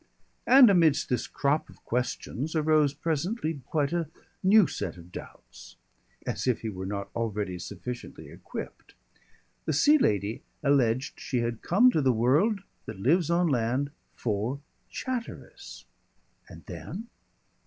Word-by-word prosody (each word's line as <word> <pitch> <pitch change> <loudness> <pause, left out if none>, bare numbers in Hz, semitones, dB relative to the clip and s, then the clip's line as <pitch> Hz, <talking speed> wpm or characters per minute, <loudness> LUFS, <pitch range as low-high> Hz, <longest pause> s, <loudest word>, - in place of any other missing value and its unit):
And 260 -4 +8
amidst 165 -6 +3
this 125 -3 -1
crop 145 +2 0
of - - -18
questions 125 +4 -2
arose 155 -2 +3
presently 160 - -2
quite 150 0 0
a 170 -3 -1 0.3
new 200 +1 +6
set - - -4
of 85 +1 -14
doubts, - - -11 0.5
as - - -3
if 125 - +1
he 110 - -3
were 95 -2 -6
not 100 0 -4
already 105 -5 -2
sufficiently 125 +7 -7
equipped. - - -9 0.7
The 155 - 0
Sea 295 - +5
Lady 105 - 0 0.2
alleged 130 -3 +2
she 125 -3 -1
had 115 -1 -3
come 240 +9 +5
to 155 - +1
the 130 -2 +4
world 145 - +2 0.3
that - - -7
lives 160 - +2
on 175 +1 +3
land, 130 +1 0 0.2
for 115 +4 -2 0.3
Chatteris. 255 -3 -6 0.6
And - - -13
then 225 +5 -7
140 Hz, 135 wpm, -28 LUFS, 115-170 Hz, 0.7 s, And